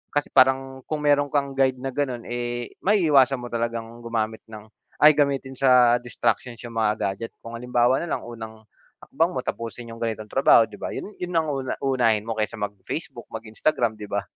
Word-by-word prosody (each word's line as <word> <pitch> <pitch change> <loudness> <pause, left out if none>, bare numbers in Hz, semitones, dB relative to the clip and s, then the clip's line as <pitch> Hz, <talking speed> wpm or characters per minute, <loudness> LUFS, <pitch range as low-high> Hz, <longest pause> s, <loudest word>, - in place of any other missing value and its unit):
kasi 145 - 0
parang 130 0 +3
kung 150 -1 -3
meron 145 -1 +3
kang 140 -1 0
guide 135 -1 +2
na 135 +1 -5
gano'n, 130 -4 -2
eh, 120 0 -4
maiiwasan 150 - +4
mo 120 -1 -8
talagang 115 0 -3
gumamit 110 -2 -2
ng 110 -2 -10 0.4
ay 150 - +10
gamitin 140 -2 0
sa 125 -2 +5
distractions 120 0 -2
yung 120 - -7
mga 105 -1 +2 0.2
gadget 115 +4 -8
kung 115 - -8
halimbawa 125 +1 +2
na 170 - -4
lang - - -7
unang, 110 -2 -9 0.4
hakbang - - 0
mo - - -2
tapusin 115 0 -5
yung 115 - -10
ganitong 110 -2 -4
trabaho 135 -3 +6
'di - - -9
ba - - -4
yun 205 - -6
yun 180 -1 -4
ang 160 -2 +2
una 135 -2 -3
unahin 120 -6 +2
mo 115 - -5
kaysa 105 - -1
mag-Facebook, 105 -2 -6
mag-Instagram, 110 +1 -1
'di 105 - -7
ba? 100 0 -2
120 Hz, 190 wpm, -24 LUFS, 115-135 Hz, 0.4 s, ay